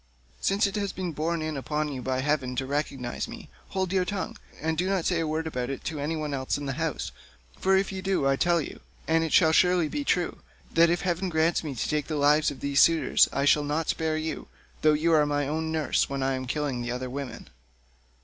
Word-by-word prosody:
Since 200 +3 +2
it 200 - -1
has 200 -2 -1
been 185 -2 -4
borne 160 +2 -1
in 155 -1 -3
upon 150 +2 -2
you 135 -3 -5
by 130 0 -1
heaven 135 -3 0
to 135 +1 -1
recognise 135 -3 -3
me, - - -10 0.2
hold 190 -1 -1
your 185 -1 +3
tongue, 195 0 -3 0.2
and 160 0 -1
do 180 +4 0
not 190 -4 0
say 175 -2 +1
a 165 - -1
word 160 +1 -1
about 125 -5 -3
it 135 - -5
to 155 -1 -4
any 150 +3 -1
one 150 -2 -3
else 130 0 -1
in 145 - -5
the 135 - -2
house, 160 +1 -2 0.5
for 190 0 +3
if 195 +1 0
you 190 -1 -5
do 190 -6 0
I 135 - +3
tell 175 +3 +2
you—and 160 +2 -3
it 160 - -2
shall 160 -3 +5
surely 180 0 +4
be—that 170 - 0
if 175 +1 +1
heaven 180 0 -1
grants 160 +1 +2
me 145 -4 -4
to - - -2
take 150 -1 -1
the 155 - -2
lives 150 +1 +4
of 145 - -8
these 140 0 +1
suitors, 160 -5 +5
I 140 - 0
will 150 - -3
not 150 +2 -1
spare 160 -1 0
you, 160 0 -4 0.3
though 155 0 +5
you 160 +2 +2
are 150 -2 +4
my 145 -1 0
own 160 +2 -2
nurse, 160 -2 +1
when 135 -1 -2
I 135 0 +1
am 130 -1 -4
killing 140 -3 -2
the 120 - -4
other 125 +1 -3
women." 135 0 -6
155 Hz, 235 wpm, -27 LUFS, 140-170 Hz, 0.5 s, shall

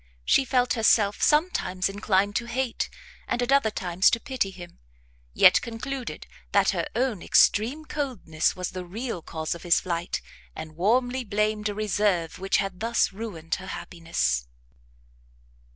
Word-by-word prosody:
She 270 - +4
felt 250 -1 +2
herself 215 -3 +3
sometimes 300 - +2
inclined 200 0 0
to 235 - -3
hate, 245 0 -2 0.4
and - - -1
at 245 - -1
other 275 -5 +4
times 180 -2 +2
to 230 - 0
pity 260 -7 -2
him; 175 -2 -12 0.6
yet - - +7
concluded 240 +2 -6 0.3
that - - +4
her - - -2
own 240 -7 0
extreme 255 +9 +3
coldness 245 - -1
was 180 -1 -4
the 185 -1 -6
real 210 +2 -5
cause 160 0 -4
of 170 - -9
his 175 -2 +3
flight, 170 -1 -2 0.4
and 160 0 -8
warmly 245 +8 +1
blamed 210 0 0
a 205 - -4
reserve 205 -6 0
which 195 +1 +1
had 195 -2 -3
thus 230 -2 +1
ruined 190 -7 -6
her 190 - -9
happiness. 165 - -2
205 Hz, 150 wpm, -26 LUFS, 175-240 Hz, 0.6 s, yet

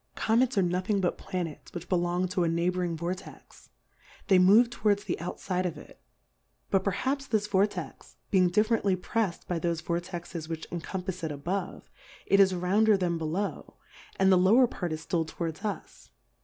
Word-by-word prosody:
Comets 235 +2 +2
are 195 - +4
no 180 +1 0
thing 200 +2 0
but 180 -2 -1
Planets, 175 -5 -5
which 175 0 -6
belong 175 0 0
to 185 -1 0
a - - +2
Neighbouring 170 0 0
Vortex, 175 +3 -7 0.6
they 190 -2 +6
move 215 +6 +6
to - - -11
wards 205 -1 +3
the - - -3
out 170 +2 -5
fide 185 -1 -1
of 170 - -6
it; - - -14 0.7
but 190 -1 +3
perhaps 265 +8 -1
this 215 -2 +1
Vortex 195 -6 -2
being 185 -2 +4
differently 210 0 +2
prefs'd 185 0 -2
by 175 -2 -1
thofe 165 -1 -2
Vortexes 170 -1 -4
which 165 -1 -4
encompafs 180 +1 -5
it, 160 - -2
a 145 - -5
bove, 180 +6 -4 0.4
it 200 - +3
is 195 -1 +6
rounder 200 +4 +3
than 175 -3 -1
below, 165 +6 -3 0.4
and 190 0 +3
the 185 - +6
lower 220 +8 +6
Part 180 -7 -4
is 155 0 -5
ftill 165 -3 0
towards 165 +2 -5
us. 200 - -6
180 Hz, 180 wpm, -28 LUFS, 170-200 Hz, 0.7 s, they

